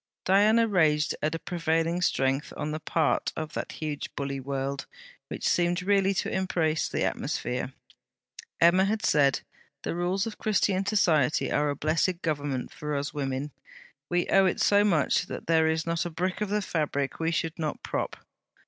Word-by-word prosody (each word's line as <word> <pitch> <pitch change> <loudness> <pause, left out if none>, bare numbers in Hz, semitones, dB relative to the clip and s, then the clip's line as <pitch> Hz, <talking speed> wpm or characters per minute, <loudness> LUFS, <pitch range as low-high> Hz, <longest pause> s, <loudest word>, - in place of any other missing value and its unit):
Diana 215 +4 +4
raged 155 -6 +2
at 155 +2 0
a - - -1
prevailing 165 0 -1
strength 135 -3 +1
on 150 - -3
the 155 - -3
part 160 0 0
of 155 -1 -5
that - - -4
huge 150 -2 -4
bully 140 -1 -3
world, 135 +1 -3 0.4
which - - -3
seemed 175 +1 +1
really 195 0 +3
to - - -1
embrace 165 -4 0
the - - -1
atmosphere. 125 +2 -2 0.9
Emma 175 +3 +5
had 220 +2 -1
said: 140 -6 +3 0.4
'The - - -2
rules 180 +3 0
of 225 - -7
Christian 200 -2 +1
Society 165 - +2
are 150 0 +2
a 145 - -1
blessed 165 +5 0
Government 145 -5 -2
for 150 0 -4
us 140 +1 -3
women. 140 0 -3 0.6
We 175 0 +1
owe 195 -1 +5
it 185 - -1
so 205 0 +4
much 170 -9 +2
that - - -6
there 160 -1 +3
is 160 0 0
not 170 0 0
a 175 - -3
brick 180 +4 -2
of 210 - -1
the 210 0 0
fabric 145 -5 -2
we 165 0 +1
should 165 0 -2
not 155 -2 -3
prop.' - - -3
165 Hz, 175 wpm, -27 LUFS, 150-185 Hz, 0.9 s, Emma